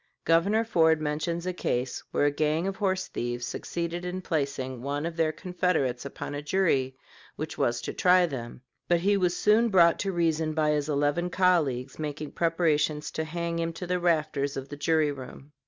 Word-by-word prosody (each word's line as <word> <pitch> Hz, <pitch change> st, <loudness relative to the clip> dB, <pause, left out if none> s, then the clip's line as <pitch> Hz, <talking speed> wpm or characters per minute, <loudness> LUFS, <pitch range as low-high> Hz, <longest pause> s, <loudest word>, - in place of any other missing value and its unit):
Governor 200 Hz, +7 st, +3 dB
Ford 160 Hz, -6 st, +3 dB
mentions 155 Hz, +3 st, -2 dB
a 185 Hz, -, -1 dB
case 125 Hz, -7 st, -2 dB
where -, -, +1 dB
a 145 Hz, -, +3 dB
gang 155 Hz, +3 st, 0 dB
of 195 Hz, 0 st, -2 dB
horse 190 Hz, -3 st, 0 dB
thieves 120 Hz, 0 st, -3 dB
succeeded 170 Hz, +4 st, -4 dB
in 180 Hz, +1 st, -4 dB
placing 140 Hz, -6 st, -2 dB
one 145 Hz, +3 st, -2 dB
of 170 Hz, 0 st, -4 dB
their 160 Hz, -1 st, +2 dB
confederates 160 Hz, -9 st, -1 dB
upon 140 Hz, -, -6 dB
a 145 Hz, -, -4 dB
jury 150 Hz, -6 st, +1 dB, 0.4 s
which 155 Hz, +1 st, -5 dB
was 120 Hz, 0 st, 0 dB
to -, -, -4 dB
try 180 Hz, 0 st, +5 dB
them; 125 Hz, -6 st, -6 dB, 0.3 s
but 175 Hz, -1 st, +2 dB
he 200 Hz, +3 st, +3 dB
was 180 Hz, -3 st, +1 dB
soon 220 Hz, +3 st, +4 dB
brought 170 Hz, -4 st, +5 dB
to 195 Hz, -, -1 dB
reason 160 Hz, -3 st, 0 dB
by 155 Hz, -1 st, +2 dB
his 150 Hz, 0 st, -1 dB
eleven 145 Hz, +4 st, +1 dB
colleagues 160 Hz, -9 st, +1 dB
making 150 Hz, -1 st, -4 dB
preparations 155 Hz, -3 st, +1 dB
to 160 Hz, -, -2 dB
hang 170 Hz, +1 st, -3 dB
him 165 Hz, 0 st, -1 dB
to 180 Hz, -, -6 dB
the 180 Hz, 0 st, 0 dB
rafters 155 Hz, -5 st, 0 dB
of 135 Hz, 0 st, -6 dB
the 145 Hz, -, -6 dB
jury 155 Hz, +1 st, +2 dB
room. 135 Hz, +1 st, -10 dB
160 Hz, 190 wpm, -27 LUFS, 145-175 Hz, 0.4 s, try